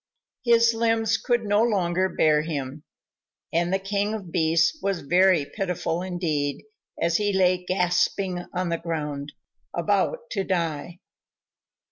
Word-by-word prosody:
His 235 -1 +4
limbs 225 -1 +1
could 240 -2 0
no 205 0 +2
longer 190 -5 +1
bear 155 -3 +3
him, 145 -2 -5 0.7
and 170 +2 +1
the 190 - +3
King 200 +2 -1
of 190 -6 -8
Beasts 170 - +2
was 195 -3 -1
very 175 +1 +3
pitiful 180 -1 -3
indeed 165 -6 -2 0.4
as 170 0 +2
he 205 -1 0
lay 185 -2 +2
gasping 180 0 0
on 180 -1 -2
the 170 -1 -1
ground, 150 -4 -4 0.4
about - - 0
to 195 - -1
die. 170 -3 -2
180 Hz, 130 wpm, -25 LUFS, 165-200 Hz, 0.7 s, His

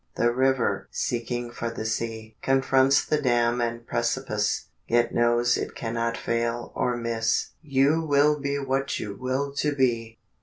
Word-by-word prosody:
The 120 0 +2
river 130 -6 +1
seeking 120 0 -3
for 115 -1 -4
the 115 -1 -5
sea 110 0 -3
Confronts 135 +1 +3
the 150 -1 0
dam 120 -2 +2
and 115 0 -2
precipice, 120 -3 -1 0.2
Yet 120 0 +2
knows 120 +1 +3
it - - -4
cannot 115 0 -2
fail 115 0 -2
or 125 -1 0
miss; 115 -1 0
_You 145 +3 +2
will 150 +1 +4
be 140 0 -1
what 135 0 -1
you 100 -1 -5
will 130 +4 -2
to 150 0 0
be! 115 -4 0
120 Hz, 150 wpm, -26 LUFS, 115-135 Hz, 0.2 s, will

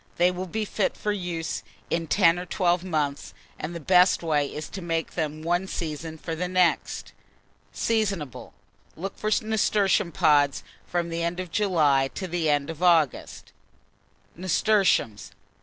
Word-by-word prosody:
They 175 +1 +4
will 180 +1 -5
be 215 +4 -2
fit 205 -1 -1
for 210 - -1
use 175 -5 -3 0.3
in 165 -1 -1
10 170 -1 +4
or 180 - -7
12 175 -1 +1
months; 150 -6 -2 0.2
and 165 +3 -5
the - - -4
best 180 +3 +4
way 150 -3 +1
is 150 +2 -6
to 195 - -7
make 165 -1 -2
them 155 -2 -3
one 175 +3 0
season 160 -2 -5
for 165 +1 -5
the 180 +3 -2
next. 180 -1 0 0.6
Seasonable. 200 - -2 0.4
Look 195 +4 -5
for 215 - -2
nasturtium 210 -4 +2
pods 145 -6 +3 0.2
from 175 -1 -1
the 165 0 -3
end 170 +1 -2
of 180 -2 -5
July 155 -10 +3
to 190 - -4
the 170 -2 -1
end 145 +1 +1
of 165 +1 -11
August. 165 -6 +1 0.8
[Illustration: 190 - +2
NASTURTIUMS. 105 - -12
170 Hz, 155 wpm, -26 LUFS, 155-185 Hz, 0.8 s, They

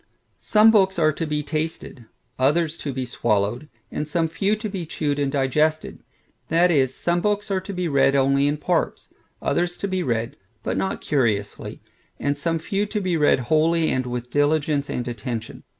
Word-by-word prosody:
Some 215 +1 +5
books 195 -4 +3
are 155 -2 +4
to 160 +2 -4
be 150 0 -1
tasted, 155 -5 -4 0.3
others 155 +4 +2
to 145 - -4
be 130 -1 -3
swallowed, 120 +3 -1 0.2
and 150 - -3
some 165 +1 0
few 195 +6 0
to 215 +1 -5
be 195 -4 -4
chewed 150 -2 -2
and 140 -1 0
digested; 150 +3 0 0.5
that 170 +2 +3
is, 135 -5 +3
some 175 0 0
books 205 0 -1
are 190 -1 0
to 190 - -7
be 180 -2 -2
read 135 -2 +3
only 140 +1 +3
in 145 +1 0
parts; 170 +2 -2 0.3
others 175 +1 0
to 200 - -3
be 185 -1 -1
read, 120 -2 -2 0.3
but - - -2
not 190 - -2
curiously; 110 -8 -1 0.4
and 145 0 0
some 165 +4 -1
few 195 +5 -2
to 210 +1 -2
be 185 -3 -1
read 150 -4 +3
wholly, 160 +5 +2
and 130 -1 -1
with 125 0 -5
diligence 145 0 +1
and 125 - -3
attention. 115 -1 -5
150 Hz, 180 wpm, -23 LUFS, 135-175 Hz, 0.5 s, Some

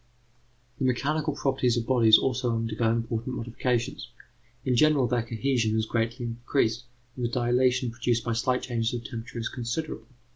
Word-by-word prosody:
The 135 - 0
mechanical 140 +5 0
properties 130 -3 +1
of 115 - -1
bodies 115 -4 +6
also 120 -2 0
undergo 115 0 0
important 115 +2 -2
modifications. 120 +1 -2 0.6
In 130 -2 +2
general, 150 0 +4
their 120 0 +1
cohesion 115 -1 0
is 110 - +1
greatly 115 +2 -1
increased, 120 0 -1 0.3
and 125 - -5
the 120 - +1
dilatation 125 0 +2
produced 120 -1 0
by 120 - -1
slight 125 +2 0
changes 115 -1 -1
of 120 - -5
temperature 115 +1 -7
is 115 0 -2
considerable. 130 +5 -4
120 Hz, 155 wpm, -27 LUFS, 115-130 Hz, 0.6 s, bodies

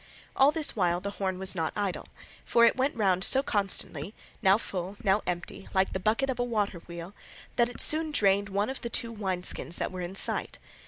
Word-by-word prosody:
All 270 +2 +6
this 305 -1 +1
while 175 -4 +2
the 200 +2 -4
horn 190 -2 -2
was 190 0 -3
not 165 -4 -2
idle, 200 -3 -2 0.4
for 235 0 +5
it - - +4
went 265 +2 0
round 190 -4 +2
so 270 +6 +4
constantly, 195 - -1 0.3
now 195 -2 +5
full, 190 -2 -5
now 195 +2 +3
empty, 175 +2 -4
like 190 0 +2
the 190 - -1
bucket 220 +8 +1
of 260 -2 -2
a - - +2
water 210 -6 -1
wheel, 170 +2 -8 0.4
that 240 -1 +3
it 245 - -10
soon 315 +1 +2
drained 200 -7 +2
one 200 +5 0
of 265 - -7
the 235 - -4
two 230 0 -2
wine 190 -5 -3
skins 170 - -1
that - - -2
were 185 -1 -5
in 175 +2 -5
sight. - - -1
200 Hz, 215 wpm, -29 LUFS, 185-235 Hz, 0.4 s, All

